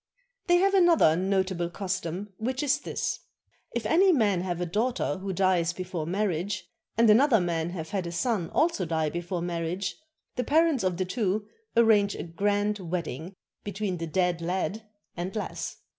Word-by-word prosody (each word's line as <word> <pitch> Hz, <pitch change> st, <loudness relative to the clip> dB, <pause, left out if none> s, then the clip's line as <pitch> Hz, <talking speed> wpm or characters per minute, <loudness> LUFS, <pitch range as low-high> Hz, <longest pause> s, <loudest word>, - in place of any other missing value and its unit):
They 350 Hz, 0 st, +5 dB
have 390 Hz, +2 st, +3 dB
another 345 Hz, -, +5 dB
notable 190 Hz, -1 st, 0 dB
custom, 190 Hz, +1 st, -4 dB
which 255 Hz, +5 st, -2 dB
is 280 Hz, -1 st, +2 dB
this: -, -, -3 dB, 0.6 s
If 235 Hz, -2 st, -2 dB
any 370 Hz, -, +5 dB
man 210 Hz, -, +2 dB
have 175 Hz, -2 st, -3 dB
a 180 Hz, -, -1 dB
daughter 215 Hz, +2 st, -1 dB
who 195 Hz, 0 st, -4 dB
dies 180 Hz, -2 st, +2 dB
before 175 Hz, -3 st, -4 dB
marriage, 190 Hz, 0 st, -1 dB, 0.3 s
and 230 Hz, 0 st, +5 dB
another 230 Hz, +2 st, +6 dB
man 170 Hz, -2 st, -1 dB
have 165 Hz, -3 st, -6 dB
had 190 Hz, -4 st, -2 dB
a -, -, -4 dB
son 180 Hz, 0 st, -1 dB
also 315 Hz, -, +1 dB
die 160 Hz, -2 st, 0 dB
before 175 Hz, +1 st, -3 dB
marriage, 175 Hz, +2 st, -2 dB, 0.4 s
the 250 Hz, -, +1 dB
parents 310 Hz, -1 st, +3 dB
of 185 Hz, -2 st, 0 dB
the 185 Hz, -, 0 dB
two 205 Hz, +1 st, -1 dB, 0.3 s
arrange 215 Hz, -3 st, +5 dB
a -, -, -5 dB
grand 205 Hz, +4 st, 0 dB
wedding 170 Hz, -1 st, -4 dB, 0.3 s
between 205 Hz, -2 st, -3 dB
the 165 Hz, 0 st, -4 dB
dead 175 Hz, +1 st, 0 dB
lad 190 Hz, +5 st, -2 dB, 0.3 s
and 180 Hz, +4 st, -4 dB
lass. 210 Hz, -, -4 dB
190 Hz, 165 wpm, -27 LUFS, 175-220 Hz, 0.6 s, another